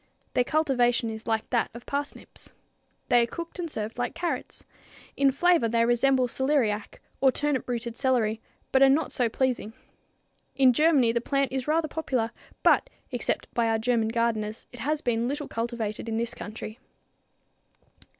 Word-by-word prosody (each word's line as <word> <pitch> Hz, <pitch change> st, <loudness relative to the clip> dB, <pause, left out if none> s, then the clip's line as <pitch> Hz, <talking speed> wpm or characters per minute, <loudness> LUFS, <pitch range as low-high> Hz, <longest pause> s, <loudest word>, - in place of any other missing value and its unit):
Their 250 Hz, -, +3 dB
cultivation 245 Hz, -5 st, +1 dB
is 220 Hz, +1 st, -8 dB
like 220 Hz, -1 st, 0 dB
that 240 Hz, -2 st, +1 dB
of 235 Hz, -, -10 dB
parsnips. 285 Hz, 0 st, -5 dB, 0.6 s
They 245 Hz, -, +6 dB
are 235 Hz, -, +1 dB
cooked 335 Hz, +6 st, -7 dB
and 340 Hz, -2 st, -3 dB
served 220 Hz, -2 st, -5 dB
like 245 Hz, -, -2 dB
carrots. 330 Hz, -8 st, -4 dB, 0.5 s
In 275 Hz, -1 st, +4 dB
flavor, 335 Hz, -3 st, +3 dB
they 230 Hz, 0 st, +3 dB
resemble 255 Hz, +2 st, +3 dB
celeriac 245 Hz, -5 st, 0 dB, 0.2 s
or 270 Hz, -1 st, +5 dB
turnip 290 Hz, -2 st, -1 dB
rooted 235 Hz, -1 st, -2 dB
celery, 235 Hz, -4 st, +1 dB, 0.3 s
but 265 Hz, -, +4 dB
are 270 Hz, -, +8 dB
not 295 Hz, +4 st, +2 dB
so 245 Hz, -3 st, +1 dB
pleasing. 245 Hz, -3 st, -1 dB, 0.8 s
In 260 Hz, -2 st, +5 dB
Germany 290 Hz, -4 st, +4 dB
the 235 Hz, 0 st, 0 dB
plant 275 Hz, +2 st, 0 dB
is 260 Hz, 0 st, -3 dB
rather 315 Hz, +1 st, +2 dB
popular, 255 Hz, -8 st, -1 dB, 0.3 s
but, -, -, +4 dB, 0.2 s
except -, -, -2 dB
by 235 Hz, -1 st, +2 dB
our 225 Hz, 0 st, +2 dB
German 225 Hz, 0 st, +1 dB
gardeners, 225 Hz, -1 st, -1 dB
it 245 Hz, -, -11 dB
has 300 Hz, +3 st, -1 dB
been 235 Hz, -2 st, 0 dB
little 290 Hz, +2 st, -3 dB
cultivated 230 Hz, -1 st, -3 dB
in 220 Hz, -, -1 dB
this 235 Hz, +1 st, -1 dB
country. 215 Hz, 0 st, -8 dB
245 Hz, 160 wpm, -27 LUFS, 230-275 Hz, 0.8 s, are